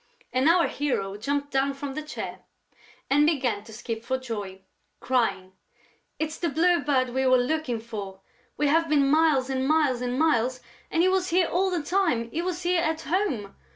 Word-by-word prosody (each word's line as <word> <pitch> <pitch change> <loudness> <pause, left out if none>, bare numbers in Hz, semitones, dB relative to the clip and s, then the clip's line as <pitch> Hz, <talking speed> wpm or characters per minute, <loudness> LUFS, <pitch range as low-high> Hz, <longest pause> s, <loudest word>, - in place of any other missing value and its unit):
And 260 +4 +3
our 340 0 +5
hero 225 -9 -2
jumped 285 +6 -2
down 270 +1 +1
from 275 -1 -5
the 310 - -4
chair 305 0 -6 0.7
and 290 +2 +4
began 250 -10 0
to 225 - -12
skip 225 0 -5
for 260 +2 -1
joy, 205 -7 -6 0.4
crying: 230 -7 0 0.7
"It's 315 0 -3
the 340 - 0
Blue 340 +3 +3
Bird 265 -3 +1
we 260 +2 0
were 255 0 +6
looking 250 -2 -1
for! 205 -4 -7 0.4
We 295 - +1
have 325 +2 +2
been 285 -2 +3
miles 300 -3 +3
and 265 0 -1
miles 295 -5 +2
and 250 0 -2
miles 255 -5 +2 0.3
and 330 - +2
he - - +4
was 370 -1 +1
here 355 +1 +3
all 380 +2 +1
the 350 -4 -2
time!... 295 -11 0
He 330 - -2
was 360 0 -3
here, 350 0 +2
at 320 -1 -1
home!... 305 - -1
275 Hz, 190 wpm, -26 LUFS, 245-320 Hz, 0.7 s, were